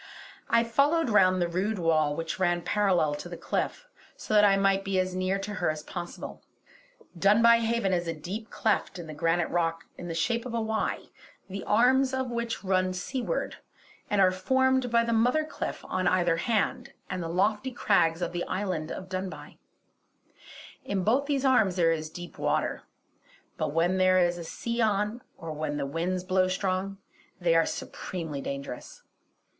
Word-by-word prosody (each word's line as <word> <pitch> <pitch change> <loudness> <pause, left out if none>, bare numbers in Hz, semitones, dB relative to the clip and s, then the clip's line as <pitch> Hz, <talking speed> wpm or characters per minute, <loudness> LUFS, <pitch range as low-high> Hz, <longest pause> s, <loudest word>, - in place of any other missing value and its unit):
I 230 0 +4
followed 280 +4 +2
round 185 -3 +5
the 175 - +1
rude 190 +5 -1
wall 155 -4 +2
which 165 +2 -4
ran 175 -2 +1
parallel 185 -7 +2
to 150 +4 -6
the 175 - -7
cliff, - - -3 0.3
so - - -5
that 210 -1 +6
I 200 -1 +5
might 195 0 +2
be 195 -1 -1
as 185 0 -1
near 185 +1 0
to 195 +1 -5
her 175 - +2
as 155 -1 -3
possible. 175 0 -7 0.7
Dunbuy 225 +6 +5
Haven 230 -4 0
is 175 -1 0
a 165 - -1
deep 200 +8 -6
cleft 210 -3 0
in 175 - -7
the 155 - -8
granite 165 +2 +1
rock 165 -1 0 0.2
in 175 - -6
the 165 - -4
shape 230 +8 0
of 235 - -5
a - - +1
Y, 220 -1 -1 0.5
the 195 +1 -6
arms 260 +4 +3
of 260 -2 -2
which 235 -2 -3
run 185 -1 +1
seawards 260 - -3 0.5
and 205 - +1
are 185 -1 +6
formed 260 +6 +2
by 235 0 +3
the 230 0 0
mother 250 +7 +2
cliff - - -5
on 185 0 -1
either 175 -2 +2
hand 220 +4 -1
and 185 -1 -4
the 165 - -4
lofty 210 +8 +1
crags 180 -8 +2
of 175 - -2
the 175 0 -2
island 185 -5 -3
of 185 - -6
Dunbuy. 185 0 -6 1.3
In 195 -2 -2
both 260 +8 +2
these 280 -2 0
arms 220 -8 +4
there 170 -3 +3
is 155 -1 -2
deep 175 +2 -10
water; - - 0 0.7
but - - -2
when 175 +4 +1
there 185 0 +5
is 175 -1 +2
a - - -5
sea 235 +8 -3
on, 210 +2 +1 0.2
or 165 -1 -7
when 150 -1 -3
the 140 - -2
wind 175 +5 -2
blows 185 0 +2
strong, 195 0 -2 0.4
they 175 -2 +2
are 165 -1 +4
supremely 160 -7 -5
dangerous. 140 -2 -7
185 Hz, 180 wpm, -28 LUFS, 175-225 Hz, 1.3 s, that